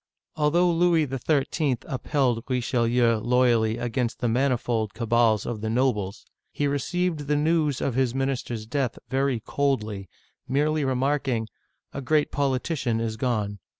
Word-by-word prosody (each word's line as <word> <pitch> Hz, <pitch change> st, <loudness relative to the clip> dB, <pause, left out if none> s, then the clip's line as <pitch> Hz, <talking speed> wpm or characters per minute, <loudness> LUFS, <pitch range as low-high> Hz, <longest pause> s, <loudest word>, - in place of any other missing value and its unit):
Although 170 Hz, +4 st, +3 dB
Louis 170 Hz, -2 st, +3 dB
XIII. 135 Hz, +1 st, 0 dB
upheld 130 Hz, -3 st, -1 dB
Richelieu 120 Hz, -2 st, +2 dB
loyally 120 Hz, -2 st, +2 dB
against 120 Hz, 0 st, -2 dB
the 120 Hz, -, -1 dB
manifold 120 Hz, -3 st, 0 dB
cabals 115 Hz, -2 st, +2 dB
of 115 Hz, -3 st, -4 dB
the 110 Hz, -, -2 dB
nobles, 110 Hz, -5 st, 0 dB, 0.3 s
he 145 Hz, -, -1 dB
received 150 Hz, +2 st, -1 dB
the 150 Hz, -, +2 dB
news 150 Hz, -2 st, +1 dB
of 135 Hz, -, 0 dB
his 130 Hz, 0 st, 0 dB
minister's 130 Hz, -4 st, -2 dB
death 125 Hz, 0 st, -2 dB
very 135 Hz, -2 st, 0 dB
coldly, 110 Hz, -8 st, -2 dB, 0.4 s
merely 150 Hz, +3 st, +1 dB
remarking, 130 Hz, -3 st, 0 dB, 0.4 s
"A 140 Hz, -, -4 dB
great 150 Hz, +3 st, +1 dB
politi 140 Hz, +3 st, 0 dB
cian 115 Hz, -4 st, 0 dB
is 115 Hz, -1 st, -2 dB
gone." 105 Hz, -4 st, -2 dB
130 Hz, 135 wpm, -25 LUFS, 115-140 Hz, 0.4 s, Although